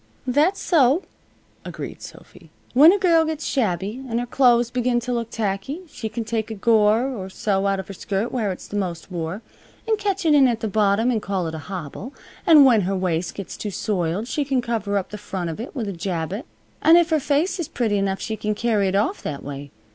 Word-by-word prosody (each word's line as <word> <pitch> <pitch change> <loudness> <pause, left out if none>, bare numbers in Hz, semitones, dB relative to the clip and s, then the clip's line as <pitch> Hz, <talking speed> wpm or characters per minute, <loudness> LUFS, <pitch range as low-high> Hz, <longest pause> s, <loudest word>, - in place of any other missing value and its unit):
"That's 295 +9 +2
so," 300 0 +3 0.6
agreed - - -7
Sophy. - - -13 0.2
"When 295 +7 +8
a 405 - +2
girl 340 -4 +4
gets 315 -1 -3
shabby, 210 - -1
and 230 0 0
her 245 - -2
clothes 240 -2 +3
begin 245 -1 +1
t' 245 +1 -4
look 235 -2 -2
tacky 215 - -3
she 225 -7 -6
can 230 +2 -4
take 220 -1 -2
a 220 - -5
gore 220 +3 +3
or 195 -8 -6
so 195 0 0
out 195 -1 0
of 190 - -6
her 195 - -7
skirt 200 +4 -3
where 220 -6 -1
it's 185 - -8
the - - -7
most 180 -2 -4
wore, 175 +5 -4 0.4
and 440 -2 +1
catch 400 -3 -1
it 310 - +5
in 280 -3 +6
at 230 -2 -1
the 220 - -1
bottom, 210 +3 +2
and 225 -3 0
call 195 -3 -2
it 160 - -4
a 160 - -5
hobble. 190 - -7 0.3
An' 305 -4 +8
when 235 -5 +5
her 195 +1 -1
waist 175 -2 -1
gets 195 -3 -7
too 210 - -5
soiled 190 0 -2
she 290 - -1
can 270 -2 0
cover 220 -4 -1
up 190 - -3
the 210 - -7
front 185 -4 -4
of 160 - -8
it 240 +6 -7
with 235 -6 -3
a 200 - -3
jabot, 180 - -4 0.3
an' 325 - +7
if 345 -1 +3
her 315 - +3
face 310 +7 0
is 335 - -2
pretty 215 -4 0
enough 195 -1 -1
she 220 - -3
can 215 0 -2
carry 215 -3 +1
it 190 - -1
off 215 - 0
that 145 -2 -5
way. 140 0 -7
220 Hz, 230 wpm, -22 LUFS, 195-260 Hz, 0.6 s, When